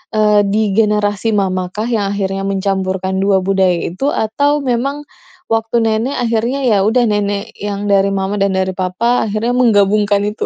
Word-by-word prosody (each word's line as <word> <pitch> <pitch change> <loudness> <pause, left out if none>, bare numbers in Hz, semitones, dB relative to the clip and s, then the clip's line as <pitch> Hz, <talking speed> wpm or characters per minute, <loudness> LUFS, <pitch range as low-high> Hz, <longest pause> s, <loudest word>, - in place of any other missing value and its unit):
eee, 210 -1 +4
di 205 +2 0 0.2
generasi 210 -1 +1
mamahkah 190 +1 -2
yang 225 -4 0
akhirnya 195 -1 -2
mencampurkan 190 -1 -2
2 195 0 +3
budaya 190 -2 +2
itu? 185 +10 -4
Atau 285 +4 0 0.2
memang 275 +5 -1 0.5
waktu 225 0 0
nenek? 225 +5 0
Akhirnya 235 +2 0
ya 230 -4 +3
udah, 240 +3 +2
nenek 205 -1 -2
yang 205 0 -4
dari 195 0 +3
mama 195 +1 -2
dan 200 0 +2
dari 190 0 0
papa, 190 +7 0
akhirnya 215 +3 -1
menggabungkan 205 -3 +3
itu? 210 +1 -4
205 Hz, 155 wpm, -16 LUFS, 195-225 Hz, 0.5 s, eee